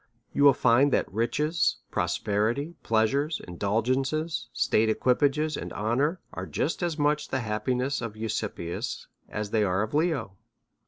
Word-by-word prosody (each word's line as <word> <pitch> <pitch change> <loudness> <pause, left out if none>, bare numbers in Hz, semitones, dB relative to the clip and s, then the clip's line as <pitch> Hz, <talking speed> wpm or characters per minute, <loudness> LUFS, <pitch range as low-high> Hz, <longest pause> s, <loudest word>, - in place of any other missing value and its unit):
You 140 - +2
will 140 -1 +8
find 130 +4 +4
that - - 0
riches, 150 - +1 0.2
prosperity, 115 +10 0
pleasures, 135 +8 +1
indulgences, 125 - -1
state, 110 +1 +2
equipage, 130 +5 +2
and 155 -1 -2
honour, 135 - 0
are - - -5
just 165 - -2
as 170 -3 -1
much 150 0 +1
the 130 - -1
hap 105 -1 -3
piness 130 +2 0
of 110 -2 -5
Eusebius 110 -6 -3 0.2
as 105 -1 -4
they 110 -1 +3
are 95 +1 +1
of 110 - -5
Leo. 150 - 0
125 Hz, 145 wpm, -27 LUFS, 110-145 Hz, 0.2 s, will